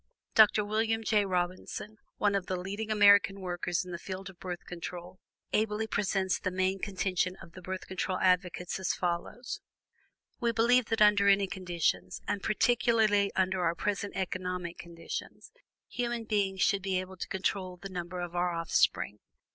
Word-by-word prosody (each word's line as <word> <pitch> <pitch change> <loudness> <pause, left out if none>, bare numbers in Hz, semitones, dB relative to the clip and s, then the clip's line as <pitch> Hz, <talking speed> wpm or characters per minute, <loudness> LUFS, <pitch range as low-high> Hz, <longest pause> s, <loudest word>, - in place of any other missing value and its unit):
Dr. 210 -1 +6
William 225 +1 0
J. 210 -2 +3
Robinson, 185 +3 -3 0.2
one 205 -1 +2
of 195 -2 -1
the 185 - -1
leading 200 +4 -4
American 205 -2 +6
workers 180 -1 -2
in 180 - -8
the 170 - -5
field 190 +1 -6
of 175 - -24
Birth 180 -2 -6
Control, 175 +1 -7 0.3
ably 215 0 +1
presents 195 -3 0
the 185 - -1
main 185 +1 0
contention 185 -2 -1
of 170 - -12
the 185 - -11
Birth 185 +1 -5
Control 185 0 -2
advocates 180 0 +1
as 190 - 0
follows: 180 +7 -3 0.8
"We 235 -2 +1
believe 240 +2 +4
that 225 -1 +3
under 205 -1 +5
any 200 0 +5
conditions, 170 - -2
and 205 -1 -1
particularly 220 -3 +3
under 190 -1 +1
our 170 0 +1
present 205 +2 -2
economic 180 -2 -3
conditions, 170 -1 -7 0.4
human 240 -1 -2
beings 200 -3 0
should 200 -2 +2
be 190 -1 0
able 185 0 -7
to - - -5
control 190 -2 -2
the 195 +2 -8
number 180 -1 -5
of 175 0 -5
our 175 0 +1
offspring. 165 -9 +1
190 Hz, 165 wpm, -30 LUFS, 180-210 Hz, 0.8 s, Dr